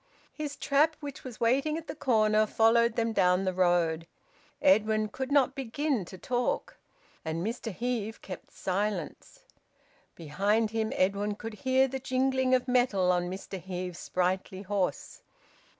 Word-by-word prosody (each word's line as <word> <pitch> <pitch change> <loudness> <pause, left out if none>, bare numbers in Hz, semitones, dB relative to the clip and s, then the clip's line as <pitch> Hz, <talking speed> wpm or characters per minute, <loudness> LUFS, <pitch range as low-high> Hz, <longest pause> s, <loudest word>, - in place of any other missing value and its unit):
His 295 -2 -5
trap, 300 +3 +2
which 285 -2 -8
was 250 -4 -9
waiting 275 +7 +2
at 330 - -7
the - - -6
corner, 215 -3 +2
followed 235 +2 +3
them 230 -1 0
down 180 -1 +3
the 185 - 0
road. 175 -3 +1 0.5
Edwin 215 -6 +3
could 265 +5 -5
not 275 -2 +4
begin 270 - -2
to 185 - -10
talk. 245 +5 -2 0.5
And 165 +2 -3
Mr 230 0 -3
Heve 225 +1 -3
kept 185 -3 -9
silence. 205 - -3 0.7
Behind 200 +8 0
him, 220 -1 -1
Edwin 200 +2 +1
could 225 +1 -7
hear 260 +3 +2
the 265 +1 -4
jingling 260 0 +1
of 255 0 -1
metal 245 -8 +3
on 175 0 0
Mr 190 0 -6
Heve's 180 -1 -5
sprightly 185 +1 -2
horse. 200 - -2
220 Hz, 145 wpm, -29 LUFS, 185-260 Hz, 0.7 s, not